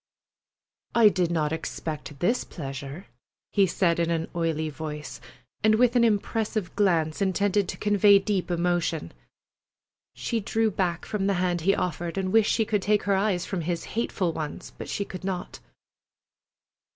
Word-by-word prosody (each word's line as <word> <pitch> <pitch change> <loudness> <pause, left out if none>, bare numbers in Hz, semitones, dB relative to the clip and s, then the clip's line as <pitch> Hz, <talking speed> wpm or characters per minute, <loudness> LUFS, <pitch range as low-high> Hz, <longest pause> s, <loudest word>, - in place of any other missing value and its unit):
"I 230 -2 +7
did 180 -4 0
not 155 -3 0
expect 155 -2 -5
this 235 +8 +2
pleasure," 140 +2 -7 0.5
he 200 -2 +4
said 170 -1 +1
in 170 -1 +1
an 165 -1 -1
oily 165 -2 0
voice, 150 0 -6 0.4
and 215 0 +5
with 245 +2 +3
an 240 - +5
impressive 215 -2 0
glance 165 -5 +1
intended 200 0 +1
to - - -4
convey 205 -1 +5
deep 195 -2 -1
emotion. 170 - 0 1.0
She 230 - -2
drew 220 +1 0
back 175 -3 -1
from 205 -3 -1
the 200 - +2
hand 175 -1 0
he 195 +4 +3
offered, 175 0 -3
and 190 -1 -1
wished 220 -1 +5
she 225 - +2
could 210 -2 0
take 210 +1 +2
her 200 - +1
eyes 190 -3 +1
from 190 -3 -3
his 170 0 -2
hateful 195 -6 -1
ones, 155 -2 -6
but - - -8
she 200 - -2
could 185 -1 -8
not. 185 -2 -4
185 Hz, 160 wpm, -26 LUFS, 165-205 Hz, 1.0 s, I